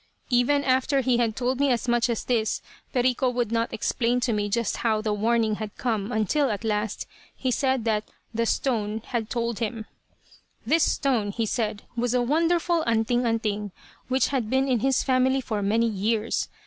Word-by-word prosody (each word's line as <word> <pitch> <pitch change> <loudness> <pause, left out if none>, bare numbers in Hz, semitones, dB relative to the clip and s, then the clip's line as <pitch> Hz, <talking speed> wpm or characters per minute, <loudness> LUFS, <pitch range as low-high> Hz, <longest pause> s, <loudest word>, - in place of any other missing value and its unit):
"Even 250 +4 +3
after 265 +1 +2
he 255 -2 +2
had 225 -3 +1
told 255 +1 -1
me 285 0 +3
as 240 0 -1
much 240 0 +2
as 235 - -2
this, 225 -3 0 0.3
Perico 255 0 +2
would 245 -3 -1
not 230 0 0
explain 240 +2 0
to 235 -1 +1
me 205 -1 -1
just 230 +1 0
how 220 -2 +1
the 215 -1 -1
'warning' 220 0 +1
had 215 -2 -6
come, 220 -3 -1
until, 245 +6 +1
at 210 +1 -3
last, 215 -1 -1 0.3
he 260 - -1
said 260 -2 +1
that 215 -2 0 0.2
'the 230 +1 0
stone' 220 -5 -1
had 230 -3 -3
told 235 -2 -2
him. 225 -1 -3 0.8
"This 310 +6 +3
stone, 240 -8 0
he 225 +2 -1
said, 215 -2 -2
was 245 +1 0
a 250 - +3
wonderful 335 +4 +2
'anting 235 +2 +1
anting' 210 -3 -1 0.4
which 260 -1 +2
had 255 -6 -1
been 265 +2 +2
in 250 -3 +2
his 265 +3 +2
family 260 0 +2
for 220 -5 -3
many 220 +4 +2
years. 220 +1 -1
235 Hz, 185 wpm, -25 LUFS, 220-255 Hz, 0.8 s, Even